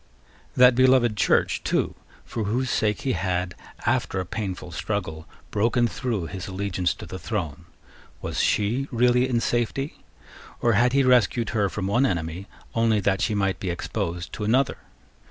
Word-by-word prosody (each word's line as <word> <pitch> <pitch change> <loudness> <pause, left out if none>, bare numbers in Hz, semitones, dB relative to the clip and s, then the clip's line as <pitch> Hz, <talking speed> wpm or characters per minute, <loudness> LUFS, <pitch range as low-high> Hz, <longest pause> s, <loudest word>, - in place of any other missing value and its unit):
That 125 0 +7
beloved 130 -3 +4
Church, - - +2
too, - - 0 0.3
for 110 -3 -3
whose 120 +4 0
sake 105 -1 +1
he 135 - 0
had, 90 -4 -1 0.3
after - - +1
a 90 - -2
painful 95 -2 -5
struggle, 80 -3 -4 0.2
broken 120 +3 +2
through 115 -7 -2
his 90 +2 -6
allegiance 95 -3 -1
to - - -9
the 95 - -7
throne, 85 -5 -4 0.5
was - - -4
she 115 +7 +1
really 125 +1 +3
in 120 -2 +2
safety? 120 +5 -1 0.6
Or 115 - +3
had 120 +4 +3
he 140 0 +4
rescued 125 -2 +3
her 105 -3 +1
from 95 +3 -4
one 120 +8 +3
enemy 85 +1 -3 0.3
only 115 -2 +2
that 95 -1 +1
she 105 0 +1
might 95 -2 0
be 95 - -3
exposed 85 0 -3
to 105 - -4
another? 125 +5 +2
105 Hz, 160 wpm, -25 LUFS, 95-120 Hz, 0.6 s, That